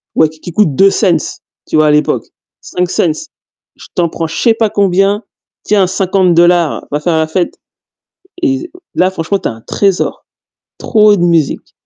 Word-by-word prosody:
ouais, 155 Hz, -, +3 dB
qui 160 Hz, +2 st, -10 dB
coûtent 165 Hz, -6 st, +1 dB
2 195 Hz, +6 st, +5 dB
cents 185 Hz, -6 st, +2 dB, 0.5 s
tu -, -, 0 dB
vois, 155 Hz, -1 st, +4 dB
l'époque, 150 Hz, 0 st, +1 dB, 0.4 s
5 180 Hz, 0 st, -2 dB
cents 165 Hz, -, -1 dB, 0.5 s
Je -, -, -14 dB
t'en 175 Hz, -1 st, +2 dB
prends, 165 Hz, 0 st, -3 dB
je 160 Hz, -, -7 dB
sais 230 Hz, -2 st, +3 dB
pas 225 Hz, -1 st, 0 dB
combien, 200 Hz, +1 st, +1 dB, 0.4 s
tiens, 200 Hz, -3 st, +2 dB
50 185 Hz, -1 st, +1 dB
dollars, 175 Hz, -1 st, +2 dB
va 145 Hz, -, 0 dB
faire 160 Hz, +1 st, 0 dB
la 160 Hz, 0 st, +1 dB
fête 175 Hz, +2 st, -2 dB, 0.8 s
et 300 Hz, +3 st, -1 dB, 0.2 s
là, 185 Hz, +1 st, +2 dB
franchement, 190 Hz, +2 st, -2 dB
tu -, -, -2 dB
as -, -, -4 dB
un 115 Hz, -, -13 dB
trésor, 195 Hz, -3 st, -1 dB, 0.5 s
trop 210 Hz, -2 st, +3 dB
de 175 Hz, -, -1 dB
musique. 170 Hz, -4 st, 0 dB
180 Hz, 170 wpm, -13 LUFS, 160-200 Hz, 0.8 s, 2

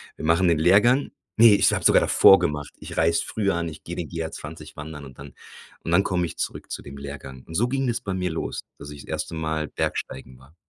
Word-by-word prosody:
wir -, -, -7 dB
machen 85 Hz, +3 st, +3 dB
den 85 Hz, -2 st, +3 dB
Lehrgang." 105 Hz, -, +4 dB, 0.3 s
Ne, 115 Hz, -2 st, +8 dB
ich -, -, +4 dB
habe -, -, -2 dB
sogar -, -, +6 dB
davor 95 Hz, -, +6 dB
gemacht. 75 Hz, -4 st, -3 dB
Ich -, -, -9 dB
reise 85 Hz, +1 st, +2 dB
früher 100 Hz, -3 st, -1 dB
an, 85 Hz, -1 st, -2 dB
ich 75 Hz, -1 st, -12 dB
geh 85 Hz, -, -7 dB
den 85 Hz, -2 st, -4 dB
GR-20 80 Hz, -1 st, -7 dB
wandern 75 Hz, -1 st, -8 dB
und 65 Hz, -2 st, -14 dB
dann 70 Hz, -2 st, -11 dB, 0.5 s
und 80 Hz, -, -4 dB
dann 85 Hz, -, +5 dB
komme 90 Hz, -2 st, 0 dB
ich 80 Hz, -, -8 dB
zurück -, -, -5 dB
zu -, -, -4 dB
dem 70 Hz, -, -11 dB
Lehrgang. 70 Hz, -2 st, -9 dB
Und 80 Hz, -, -11 dB
so 120 Hz, +8 st, +2 dB
ging 135 Hz, +1 st, -1 dB
das 120 Hz, -2 st, -1 dB
bei 95 Hz, -2 st, -4 dB
mir 90 Hz, -2 st, -2 dB
los, 80 Hz, -, -4 dB, 0.2 s
dass 70 Hz, -, -9 dB
ich 75 Hz, -1 st, -10 dB
das -, -, -15 dB
1. 80 Hz, +1 st, -4 dB
Mal 80 Hz, -1 st, -2 dB
Bergsteigen 65 Hz, -1 st, -4 dB
war. 70 Hz, +5 st, -20 dB
80 Hz, 240 wpm, -24 LUFS, 75-90 Hz, 0.5 s, Ne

